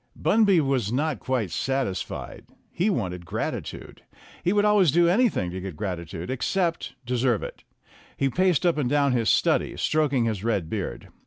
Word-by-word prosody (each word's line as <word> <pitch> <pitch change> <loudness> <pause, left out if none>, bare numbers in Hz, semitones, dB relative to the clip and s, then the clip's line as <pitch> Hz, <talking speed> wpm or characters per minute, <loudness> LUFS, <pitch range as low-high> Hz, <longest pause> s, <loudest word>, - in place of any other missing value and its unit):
Bunby 205 -5 +4
was 130 -7 0
not 150 +3 -1
quite 125 -8 -2
satisfied. 130 +3 -3 0.3
He 185 +5 0
wanted 90 - -2
grati 80 - -3
tude. - - -10 0.4
He 180 - +2
would 205 +1 +3
always 205 -7 +4
do 170 +3 +4
anything 185 - +2
to 95 +1 -5
get 95 -3 -6
gratitude, 85 0 -5
except 165 +7 -1
deserve 125 -2 +1
it. - - -8 0.5
He 135 - +1
paced 180 +3 +2
up 170 -3 +2
and 130 -4 0
down 140 -1 +2
his 120 -3 +1
study, - - +2
stroking 145 -6 +1
his 105 -4 -2
red 100 -8 -1
beard. 95 - -4
130 Hz, 165 wpm, -25 LUFS, 100-170 Hz, 0.5 s, Bunby